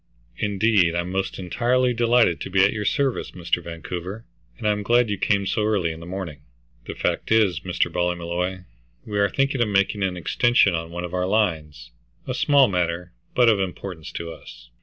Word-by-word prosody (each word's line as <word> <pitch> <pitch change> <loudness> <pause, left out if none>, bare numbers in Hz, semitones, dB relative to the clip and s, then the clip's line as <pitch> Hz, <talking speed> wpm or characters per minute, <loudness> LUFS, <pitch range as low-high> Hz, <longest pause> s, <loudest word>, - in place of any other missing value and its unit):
"Indeed, 100 -4 +2
I'm 85 +1 -2
most 95 +1 -2
entirely 125 +7 +1
delighted 120 -6 +3
to - - -5
be 95 0 +4
at 100 - +1
your 105 -2 -3
service, 135 +3 0
Mr. 90 -1 -2
Vancouver, 90 +5 -6 0.3
and - - -3
I'm 105 0 +1
glad 120 +1 +2
you 100 - -1
came 100 -1 +1
so 105 - 0
early 100 -6 +1
in 80 - -8
the 85 - -10
morning." 90 -6 -6 0.5
"The - - -5
fact - - -2
is, 105 -7 +3
Mr. 90 0 -1
Ballymolloy, 90 +1 -2 0.4
we 105 -1 -2
are 100 0 +3
thinking 135 -2 0
of 115 - +3
making 100 0 +1
an 95 -2 -1
extension 110 +2 +3
on 80 0 -3
one 85 +1 -5
of 90 0 -6
our 90 0 0
lines; 80 - -1 0.3
a - - -3
small 140 -2 +4
matter, 90 -2 -2 0.2
but 125 -1 +5
of 110 -3 +4
importance 90 -3 -5
to 85 0 -5
us." - - -13
95 Hz, 190 wpm, -23 LUFS, 85-110 Hz, 0.5 s, but